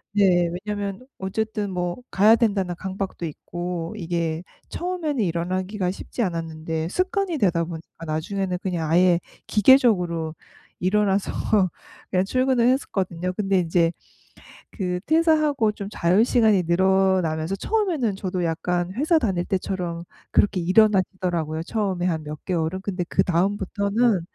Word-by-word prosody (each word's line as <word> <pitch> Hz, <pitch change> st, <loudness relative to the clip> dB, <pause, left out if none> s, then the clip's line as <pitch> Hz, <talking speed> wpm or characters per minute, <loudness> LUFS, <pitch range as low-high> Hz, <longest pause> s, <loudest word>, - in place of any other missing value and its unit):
네. 180 Hz, -4 st, +4 dB, 0.2 s
왜냐면 205 Hz, +2 st, -4 dB
어쨌든 210 Hz, +2 st, -2 dB
뭐 175 Hz, -1 st, -2 dB
'가야 215 Hz, +4 st, +5 dB
된다.'는 200 Hz, -6 st, 0 dB
강박도 190 Hz, -2 st, -4 dB
있고 175 Hz, +3 st, -5 dB
이게 165 Hz, -3 st, -2 dB, 0.3 s
처음에는 335 Hz, -8 st, -2 dB
일어나기가 185 Hz, +2 st, -1 dB
쉽지 235 Hz, +5 st, -4 dB
않았는데 160 Hz, -3 st, -3 dB
습관이 370 Hz, -, 0 dB
되다 175 Hz, -, +2 dB
보니까 165 Hz, 0 st, -9 dB
나중에는 180 Hz, +4 st, -2 dB
그냥 170 Hz, -5 st, -2 dB
아예 175 Hz, +1 st, +4 dB, 0.3 s
기계적으로 185 Hz, -, +3 dB, 0.5 s
일어나서 200 Hz, +1 st, +1 dB, 0.8 s
그냥 185 Hz, -1 st, +2 dB
출근을 255 Hz, +1 st, +2 dB
했었거든요. 185 Hz, -9 st, -1 dB
근데 195 Hz, -1 st, +1 dB
인제 165 Hz, 0 st, +2 dB, 0.8 s
그 180 Hz, -3 st, -3 dB
퇴사하고 310 Hz, -7 st, +3 dB
좀 200 Hz, -1 st, -7 dB
자유시간이 210 Hz, +2 st, +3 dB
늘어나면서 190 Hz, -2 st, +2 dB
처음에는 330 Hz, -, 0 dB
저도 185 Hz, -2 st, -2 dB
약간 175 Hz, +2 st, -1 dB
회사 310 Hz, -, +3 dB
다닐 190 Hz, -, 0 dB
때처럼 180 Hz, -3 st, -3 dB, 0.3 s
그렇게 200 Hz, -2 st, +2 dB
일어나지더라고요 185 Hz, -4 st, +2 dB
처음에 190 Hz, -3 st, -1 dB
한 160 Hz, -3 st, -1 dB
몇 150 Hz, 0 st, -8 dB
개월은. 175 Hz, 0 st, -1 dB
근데 190 Hz, -2 st, -3 dB
그다음부터는 200 Hz, +3 st, +1 dB
190 Hz, 325 characters per minute, -24 LUFS, 175-210 Hz, 0.8 s, 가야